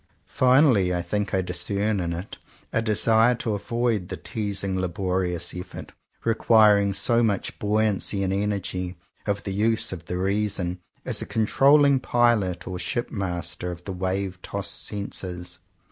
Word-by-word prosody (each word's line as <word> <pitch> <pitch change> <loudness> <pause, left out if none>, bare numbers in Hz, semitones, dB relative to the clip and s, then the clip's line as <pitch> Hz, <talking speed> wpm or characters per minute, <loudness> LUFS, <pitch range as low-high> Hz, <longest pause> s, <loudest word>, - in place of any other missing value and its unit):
Finally 125 - +4
I 90 - -2
think 100 +3 -2
I 95 -1 +1
discern 100 +4 -1
in 85 -2 -2
it 85 +4 -6 0.3
a 115 - +2
desire 115 +2 +4
to 115 -2 -2
avoid 115 -2 -1
the - - -4
teasing 100 -3 -3
laborious 90 -1 -1
effort, 90 0 -8 0.3
re 115 - +3
quiring 105 -3 +5
so 115 +5 +1
much 105 -4 -1
buoyancy 105 -1 +1
and 95 0 0
energy, 95 -3 -2 0.3
of 100 0 -1
the 100 - -4
use 110 +3 0
of 85 -3 -7
the 90 - -3
reason 95 -2 -1 0.3
as - - -2
a - - -5
controlling 140 +5 +4
pilot 115 -9 +1
or 90 -1 -4
ship 120 +6 -2
master 90 -3 -3
of 85 0 -9
the 95 - -5
wave 95 0 -3
tossed 100 0 -1
senses. 90 -3 -5
100 Hz, 150 wpm, -25 LUFS, 90-110 Hz, 0.3 s, quiring